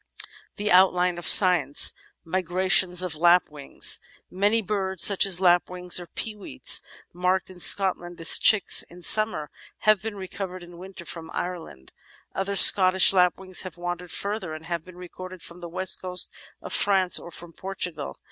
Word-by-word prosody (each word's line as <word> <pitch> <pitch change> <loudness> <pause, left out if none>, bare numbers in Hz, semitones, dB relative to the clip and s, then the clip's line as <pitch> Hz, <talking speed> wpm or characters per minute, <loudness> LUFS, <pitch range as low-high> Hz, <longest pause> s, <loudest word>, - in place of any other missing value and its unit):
428 205 - -7
The - - -1
Outline 180 -1 +2
of 175 - -4
Science 175 -8 +5 0.3
Migrations 185 +1 0
of 180 -4 -5
Lapwings 160 -3 0 0.3
Many 205 +4 0
birds, 190 -1 -2
such 200 -1 +4
as 185 -2 -2
lapwings, 180 0 0
or 175 - -11
peewits, 210 - -1 0.3
marked 180 +1 -2
in 180 - -16
Scotland 175 -2 +2
as 165 - +2
chicks 215 -3 +3
in 175 0 -15
summer 215 -9 +2 0.3
have 215 -2 +2
been 220 0 -7
recovered 185 -1 -8
in 175 0 -15
winter 185 -1 -12
from 165 -1 -10
Ireland. 165 - -8 0.4
Other 195 +1 -4
Scottish 185 0 +6
lapwings 185 0 0
have 185 -3 -9
wandered 175 0 -7
further 200 -5 -6
and 155 +1 -12
have 170 -1 -5
been 180 0 -16
recorded 185 0 -12
from 170 +1 -13
the 175 -1 -10
west 185 +2 -2
coast 180 -1 -1 0.3
of - - -7
France 190 -3 +1
or - - -12
from 170 0 -13
Portugal. 180 - -6
180 Hz, 155 wpm, -23 LUFS, 175-190 Hz, 0.4 s, Scottish